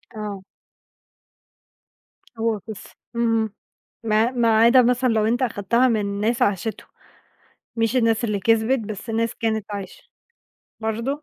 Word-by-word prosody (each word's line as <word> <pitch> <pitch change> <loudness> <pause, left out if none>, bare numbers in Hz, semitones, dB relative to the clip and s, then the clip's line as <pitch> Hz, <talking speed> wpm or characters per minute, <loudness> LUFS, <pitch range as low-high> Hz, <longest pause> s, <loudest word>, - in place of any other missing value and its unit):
آه. 210 -3 -5 2.0
هو 225 -2 0
بس، 220 -3 -8 0.3
اهم، 225 -2 +1 0.5
ما 220 +2 +2
ما 230 -3 +2
عدا 245 +2 +7
مثلًا 250 +1 +2
لو 220 -2 +2
أنت 240 +4 0
أخدتها 235 +2 +1
من 205 -3 -1
ناس 230 +2 0
عاشتُه، 205 +2 -1 0.9
مش 225 +2 +1
الناس 230 -1 +2
اللي 210 -3 -1
كِسبِت، 225 +5 +2
بس 215 +1 -6
ناس 230 +1 -1
كانت 220 -2 -1
عايشة، 200 -2 -7 0.8
برضه؟ 230 +7 -2
225 Hz, 125 wpm, -22 LUFS, 215-235 Hz, 2.0 s, عدا